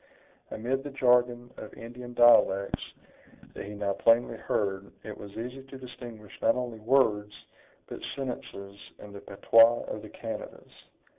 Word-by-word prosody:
Amid 130 +4 -2
the 145 - -5
jargon 125 -2 +2
of - - -9
Indian 120 +1 -9
dialects 100 -5 +5 0.7
that - - -7
he 105 +1 -8
now 100 -1 -1
plainly 115 +3 +3
heard, 100 -3 -2
it 105 -1 -7
was 100 - -10
easy 125 +4 -6
to 135 0 -11
distinguish 120 -5 -11
not - - +4
only 125 -3 -4
words, 105 -3 +2 0.5
but - - -8 0.2
sentences, 100 -7 -6 0.2
in 105 -1 -12
the 100 - -8
patois 115 +3 +5
of 105 - -6
the 110 - -10
Canadas. 115 -1 -8
115 Hz, 145 wpm, -28 LUFS, 105-125 Hz, 0.7 s, dialects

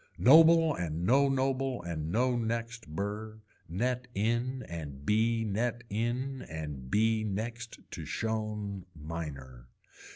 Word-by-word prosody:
Noble 160 +3 +7
and 85 - -3
no 140 +6 +5
noble 135 -3 0
and 80 -2 -3
no 125 +4 +2
next 115 0 -3
burr, 105 +6 -4 0.3
net 125 +8 -1
in 120 +5 0
and 75 -4 -7
bee 115 +3 +2
net 115 +3 -1
in 125 +5 -1
and 75 -5 -6
bee 110 +3 +2
next 115 +3 -4
to - - -6
shown 105 -4 -3
miner. 75 -6 -7
110 Hz, 120 wpm, -31 LUFS, 85-120 Hz, 0.3 s, Noble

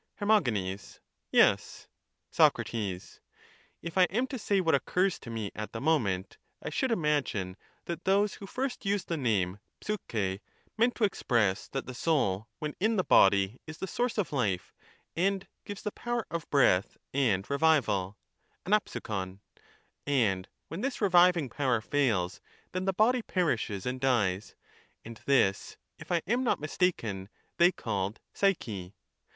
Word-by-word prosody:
Her. 205 - -5 1.1
Yes. - - +3 0.4
Soc. - - +5
If 100 -6 -4 0.8
I - - +8
am 225 +8 0
to 260 -1 -6
say 200 -2 +1
what 165 -3 +2
occurs 180 +7 +1
to - - -10
me 110 -3 -4
at 110 0 -6
the 115 - -4
moment, 110 - 0 0.2
I - - -6
should 260 - 0
imagine 145 - 0 0.3
that 170 0 -5
those 200 +2 +3
who 195 - -9
first 260 +4 -3
used 200 -1 -1
the 170 - 0
name 100 -8 0 0.2
^^vxt] 105 - -2 0.4
meant 235 +2 +2
to 235 - -2
express 115 - +1
that 135 - -4
the 130 - -7
soul 115 - 0
when 150 -1 -4
in 220 +4 +2
the 185 - +2
body 100 - +4
is 160 0 -8
the - - -3
source 240 +5 -1
of 200 -7 -1
life, 105 -10 -1 0.4
and 195 +2 0 0.2
gives 205 -1 -7
the 210 - -2
power 240 0 -3
of 170 -2 -4
breath 115 -8 +3 0.2
and 110 -8 +1
revival 125 -11 +2 0.5
(ava'\\)vxov), 105 - -1 0.7
and 105 -10 +1 0.2
when 165 +5 -6
this 270 +1 -2
reviving 180 -5 +5
power 130 -1 0
fails 110 -8 0 0.3
then 185 +1 -2
the 195 - +2
body 240 +6 +3
perishes 120 - -1
and 130 +1 -3
dies, 105 -7 +1 0.5
and 115 -1 -10
this, 125 -8 +2 0.2
if - - -10
I 170 -1 +1
am 240 +6 +1
not 240 - +1
mistaken, 115 - -1 0.3
they 175 +1 +6
called 100 - -3
psyche. 105 - -1
140 Hz, 145 wpm, -30 LUFS, -, 1.1 s, I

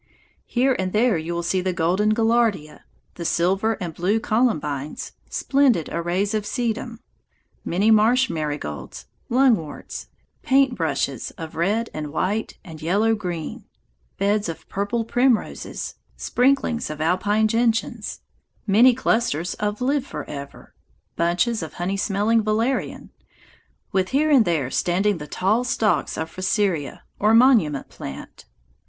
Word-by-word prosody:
Here 260 +1 +2
and 185 -1 -2
there 225 0 +3
you 160 +1 -3
will 170 - -2
see 185 +2 0
the 185 0 -1
golden 185 +6 +1
gaillardia, 225 -9 +1 0.3
the 170 - -7
silver 190 +7 +1
and 180 -6 -5
blue 190 +7 +1
columbines, 155 - -1 0.2
splendid 270 - +2
arrays 180 +5 -1
of 215 -1 0
sedum, 235 +1 -3 0.6
many 200 +6 +2
marsh 235 +4 +4
marigolds, 150 - -5 0.2
lungworts, 235 - 0 0.3
paint 270 -1 +3
brushes 140 - -2
of 160 -1 -8
red 205 +8 0
and 150 -1 -5
white 200 +7 -2
and 165 -5 -11
yellow 205 +8 +2
green, 175 -7 -5 0.5
beds 200 -1 +1
of 165 - -8
purple 205 +4 -2
primroses, 245 0 0 0.2
sprinklings 250 -2 +1
of 155 0 -6
alpine 205 +7 +2
gentians, 230 0 -1 0.4
many 230 +5 +5
clusters 180 - 0
of 210 +2 -2
live 275 +1 0
forever, 140 -1 -8 0.4
bunches 175 +7 +1
of 160 -3 -6
honey 180 +3 -2
smelling 205 +3 +1
valerian, 220 +5 -1 0.8
with 190 -1 +1
here 300 +3 +2
and 260 -6 +6
there 150 -7 0
standing 190 +2 +1
the 150 - -7
tall 210 +10 +1
stalks 225 -3 0
of 160 - -2
fraseria, 185 -3 -1 0.2
or 215 +2 +4
monument 225 - +4
plant. 70 +1 -9
205 Hz, 130 wpm, -23 LUFS, 170-230 Hz, 0.8 s, and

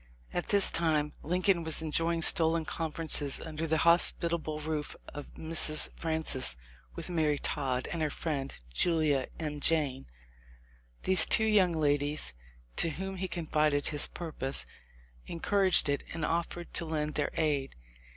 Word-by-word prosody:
At 175 - -3
this 200 -1 +3
time 155 -3 +1
Lincoln 180 +1 +1
was 160 0 +3
enjoying 165 +1 +1
stolen 165 0 +5
conferences 155 -3 +1
under 160 0 -5
the 160 0 +1
hospitable 170 -2 +2
roof 150 -1 -4
of 145 - -9
Mrs. 160 -1 0
Francis 160 - -1 0.4
with - - -6
Mary 155 -4 +1
Todd 130 -4 -3
and 170 - -3
her 155 - 0
friend 140 - -4
Julia 155 - +1
M. 150 -2 -4
Jayne. 145 -4 0 1.0
These 185 -3 +6
two 220 - +3
young 200 -5 +3
ladies, 145 - +1 0.4
to 165 - +3
whom 190 +5 -6
he 190 +1 -3
con 170 -2 -5
fided 150 -2 +1
his 145 -1 0
purpose, 150 -5 -4 0.6
encouraged 190 +2 +3
it 140 0 0
and 165 -2 -2
offered 170 +1 -3
to 170 - 0
lend 150 -1 -3
their 145 - -1
aid. 145 -4 -1
160 Hz, 140 wpm, -30 LUFS, 150-170 Hz, 1.0 s, These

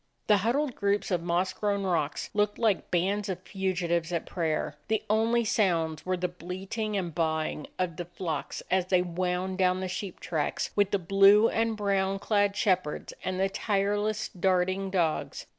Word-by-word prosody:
The 210 - +5
huddled 250 +7 0
groups 200 -1 0
of 175 -2 +1
moss 175 +2 0
grown 200 -1 -1
rocks 170 -5 -1
looked 210 -1 +1
like 220 -5 +1
bands 195 +4 0
of 185 -1 -4
fugitives 175 -4 -1
at 170 -2 -1
prayer; 155 -4 -2
the 220 0 0
only 230 +2 +2
sounds 165 -7 +1
were 185 0 +1
the 180 0 0
bleating 190 +5 -4
and 175 -4 -3
baa 160 -1 +1
ing 150 - -5
of 180 -4 -2
the 175 - -4
flocks 170 -3 -4
as 185 -1 +2
they 185 -1 +3
wound 180 +1 -2
down 185 0 +3
the 190 - -2
sheep 185 0 -5
tracks 155 -4 -2
with 205 -1 +3
the 200 - +2
blue 195 +4 +5
and 225 -1 0
brown 195 -1 +1
clad 205 0 +1
shepherds 185 -7 0
and 185 0 -2
the 195 - +3
tireless, 205 +1 0
darting 185 +1 +1
dogs. 170 -5 -1
190 Hz, 175 wpm, -28 LUFS, 175-205 Hz, -, The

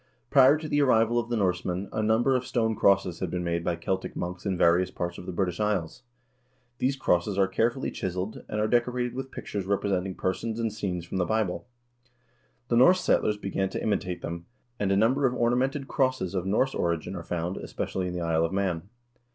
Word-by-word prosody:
Prior 135 +1 +7
to 155 0 -6
the 145 -1 +2
arrival 120 -3 +3
of 120 0 -4
the 120 - 0
Norsemen 90 -1 -1
a 110 - 0
number 110 +5 +3
of 125 - 0
stone 115 -3 0
crosses 95 -4 +2
had 95 - -2
been 90 +1 -2
made 85 -1 -1
by 85 - 0
Celtic 95 +3 -3
monks 90 +3 -4
in 95 -2 0
various 85 +2 +4
parts 85 -1 -4
of 90 - -10
the - - -3
British 90 0 -1
Isles. 105 0 -1 0.8
These 135 +2 +1
crosses 95 -6 +1
are 95 -1 +4
carefully 120 +6 0
chiseled, 95 +3 -4
and 105 - -2
are 105 - +2
decorated 125 +1 +1
with 135 +1 -5
pictures 100 -6 -5
representing 95 -2 0
persons 110 +5 -2
and 115 -2 -1
scenes 90 -5 -3
from 90 - -4
the 90 - +1
Bible. 110 +2 -1 1.0
The 120 - +3
Norse 180 +9 +6
settlers 105 -10 +2
began 95 -1 -2
to - - -4
imitate 95 -4 -1
them, 85 +2 -5 0.3
and 100 -1 +1
a 100 - +3
number 130 +6 +3
of 125 - -2
ornamented 130 +4 +1
crosses 130 -9 0
of 95 -1 -2
Norse 130 +7 +2
origin 85 +2 -1
are 85 - -5
found, 85 +2 -3
especially 95 -1 -3
in 90 - -4
the 90 - -3
Isle 80 -1 +1
of 80 - -3
Man. 95 -2 -1
100 Hz, 205 wpm, -27 LUFS, 90-120 Hz, 1.0 s, Prior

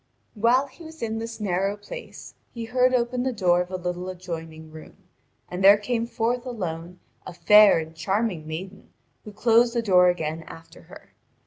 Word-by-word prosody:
While 240 +5 +2
he 280 +5 -16
was 320 -3 -10
in 225 0 -2
this 230 0 -7
narrow 195 0 -1
place, 485 - -10 0.2
he 230 -1 -5
heard 250 +2 +2
open 245 0 0
the 260 +1 -1
door 180 -6 +2
of 180 - -5
a 185 - -5
little 180 0 -4
adjoining 165 -3 -8
room, 155 0 -13 0.5
and 180 +2 -5
there 200 +1 +8
came 230 +2 -2
forth 240 +1 -1
alone 180 -7 -6 0.3
a 185 - -7
fair 210 +1 +6
and 160 0 -5
charming 190 -2 -2
maiden 185 +5 -8 0.4
who 210 - -9
closed 235 +3 +3
the 235 - 0
door 180 -4 +5
again 160 -2 -2
after 165 -1 -13
her. - - -16
200 Hz, 180 wpm, -24 LUFS, 175-235 Hz, 0.5 s, there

